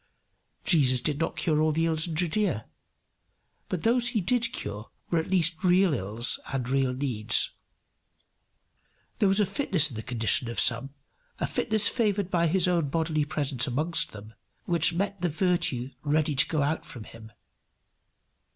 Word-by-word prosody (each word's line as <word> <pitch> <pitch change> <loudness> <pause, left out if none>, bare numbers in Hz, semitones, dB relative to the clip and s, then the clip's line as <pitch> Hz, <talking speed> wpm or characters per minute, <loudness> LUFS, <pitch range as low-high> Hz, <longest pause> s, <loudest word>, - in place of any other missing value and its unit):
Jesus 130 -7 +4
did 145 +3 -2
not 165 - -2
cure 155 -3 0
all 155 0 +2
the 165 +2 0
ills 160 0 0
in 165 - -5
Judaea. 175 - -1 1.0
But 180 - -3
those 240 +1 +2
he 240 -2 0
did 230 +5 0
cure 105 +2 -7 0.2
were 170 - +2
at 160 - -4
least 170 -2 0
real 180 -1 +3
ills 110 0 +2
and 130 -3 -3
real 135 0 +1
needs. 125 -5 +1 1.7
There 205 - +3
was 195 +2 +3
a 210 - +3
fitness 190 - +1
in - - -9
the 110 - -5
condition 115 +1 0
of 115 - -4
some, 125 +4 +1 0.4
a - - -2
fitness 215 -2 0
favoured 205 -5 -1
by 170 -1 +2
his 180 +2 +2
own 170 -5 +1
bodily 155 -1 -1
presence 140 -4 0
amongst 155 +7 0
them, 105 +1 -12 0.3
which 170 -1 +2
met 195 +2 -3
the 175 - 0
virtue 155 -7 -1
ready 150 0 0
to 135 - +3
go 155 -3 0
out 155 +3 -1
from 120 -5 -10
him. 110 0 -13
155 Hz, 165 wpm, -27 LUFS, 130-180 Hz, 1.7 s, Jesus